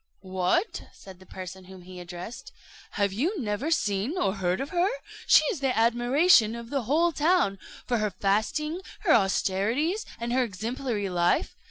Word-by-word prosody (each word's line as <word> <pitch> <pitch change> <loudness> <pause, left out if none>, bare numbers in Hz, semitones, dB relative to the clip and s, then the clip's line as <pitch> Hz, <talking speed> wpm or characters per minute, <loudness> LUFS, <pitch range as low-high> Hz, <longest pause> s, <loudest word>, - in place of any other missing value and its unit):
"What!" 185 - 0
said 190 -2 -13
the 185 - -17
person 185 0 -9
whom 185 -1 -12
he 180 0 -10
addressed, 175 +6 -8 0.4
"have 200 -1 0
you 330 - -1
never 220 +4 -2
seen 215 - 0
or 195 - +1
heard 185 -2 -1
of 275 - -4
her? 360 +1 +2 0.4
She - - +7
is 370 - -5
the 270 -2 0
admiration 240 +2 +4
of 235 0 -9
the 280 -2 0
whole 325 +7 +2
town, 305 - +2 0.3
for 240 -2 0
her 215 0 0
fasting, 220 - -1 0.2
her 340 -7 +4
austerities, 225 - +1 0.2
and 235 +1 -3
her 260 - +3
exemplary 225 0 -3
life. 175 -1 +1
225 Hz, 165 wpm, -27 LUFS, 190-290 Hz, 0.4 s, She